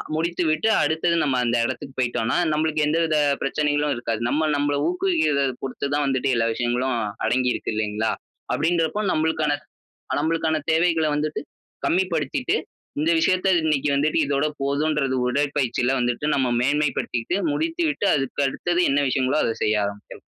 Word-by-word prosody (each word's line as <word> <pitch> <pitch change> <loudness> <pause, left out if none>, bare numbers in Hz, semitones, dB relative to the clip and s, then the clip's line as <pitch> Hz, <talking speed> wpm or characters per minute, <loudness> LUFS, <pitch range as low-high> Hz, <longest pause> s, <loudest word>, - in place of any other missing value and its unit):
முடித்து 170 +2 -1
விட்டு, 155 +7 +1 0.2
அடுத்தது 160 +3 +1
நம்ம 135 -3 +1
அந்த 120 +1 +1
இடத்துக்கு 130 +2 -5
போயிட்டோம்னா, 120 0 0
நம்மளுக்கு 155 0 0
எந்த 160 +2 +1
வித 155 -2 +1 0.2
பிரச்சனைகளும் 145 +1 0
இருக்காது. 115 -1 -3
நம்ம, 155 +1 +1
நம்பள 145 0 0
ஊக்குவிக்கிறத 345 - +1 0.2
பொருத்து 135 +1 -3
தான் 145 0 +1
வந்துட்டு, 135 -1 0
எல்லா 115 0 +1
விஷயங்களும் 125 +2 -1 0.3
அடங்கி 125 +1 +1
இருக்கு - - -4
இல்லைங்களா? 110 +1 -1 0.4
அப்படின்றப்போ, 165 +4 0
நம்மளுக்கான 155 -1 +1 0.6
அ - - +1
நம்மளுக்கான 160 0 0
தேவைகளை 165 -1 +2
வந்துட்டு 150 0 -2 0.4
கம்மி 185 +3 +3
படுத்திட்டு, 145 -4 -1 0.4
இந்த 160 +3 +2
விஷயத்தை, 185 +3 +2
இன்னைக்கு 150 -2 +1
வந்துட்டு 150 +3 +1
இதோட 140 +1 0 0.2
போதுன்றது, 140 -1 0
உடற்பயிற்சில 135 -2 0
வந்துட்டு, 120 +3 -1
நம்ம 130 -3 +1
மேன்மை 145 +3 +2
படுத்திட்டு 120 +10 -2
முடித்து 330 +3 -1
விட்டு, 285 -8 -2
அதுக்கு 135 0 -1
அடுத்தது 175 +5 -1
என்ன 145 - +2
விஷயங்களோ, 130 +3 +1
அத 115 - 0
செய்ய 105 -1 +2
ஆரம்பிக்கலாம். 100 0 -8
145 Hz, 150 wpm, -23 LUFS, 130-160 Hz, 0.6 s, கம்மி